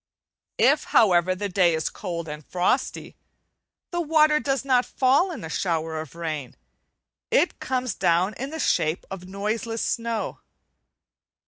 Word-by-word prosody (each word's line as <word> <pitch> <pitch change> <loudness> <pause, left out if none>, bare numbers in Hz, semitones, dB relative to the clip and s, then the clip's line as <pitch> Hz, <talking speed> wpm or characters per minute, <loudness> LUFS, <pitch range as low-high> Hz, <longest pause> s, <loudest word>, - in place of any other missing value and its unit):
If, - - +4
however, 185 -4 +4
the 205 +2 -3
day 180 -3 +3
is 160 - -1
cold 170 -2 -5
and 150 0 -7
frosty, 185 - -1 0.8
the 345 0 -1
water 305 -1 +4
does 275 -2 -1
not 255 -2 +3
fall 270 +10 +2
in 330 - -7
a - - -5
shower 160 -2 -2
of 160 0 -11
rain; 155 -6 -5 0.7
it - - +2
comes 255 -3 -2
down 175 +5 +2
in 270 +6 -5
the 320 +1 -6
shape 155 - +1
of 180 -1 -7
noiseless 215 +4 -3
snow. 230 -1 -2
200 Hz, 140 wpm, -25 LUFS, 170-260 Hz, 0.8 s, If